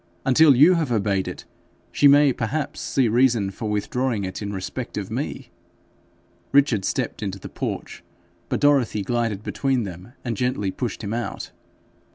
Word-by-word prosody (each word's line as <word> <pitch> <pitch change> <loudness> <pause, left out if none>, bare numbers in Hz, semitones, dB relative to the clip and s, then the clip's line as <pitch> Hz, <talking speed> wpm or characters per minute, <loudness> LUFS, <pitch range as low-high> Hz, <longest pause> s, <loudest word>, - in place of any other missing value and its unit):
Until 140 +1 +6
you 150 +8 +7
have 160 -7 0
obeyed 100 -4 0
it, - - -7 0.5
she 145 - +4
may 140 -1 +6
perhaps 135 +7 -3
see 130 -3 +1
reason 115 -3 +2
for 110 +2 -5
withdrawing 120 +1 -1
it 95 +2 -5
in 100 -1 -4
respect 95 -2 -5
of - - -4
me.' - - -4 1.0
Richard 135 -8 +3
stepped - - -2
into 100 -2 -3
the 95 - -9
porch, - - -5 0.5
but - - -1
Dorothy 135 -8 +3
glided 115 -2 -1
between 135 -1 0
them, 95 +4 -9
and 120 -2 -2
gently 125 -4 -1
pushed 120 -1 -4
him 105 +1 -3
out. 120 0 -4
120 Hz, 160 wpm, -23 LUFS, 100-135 Hz, 1.0 s, you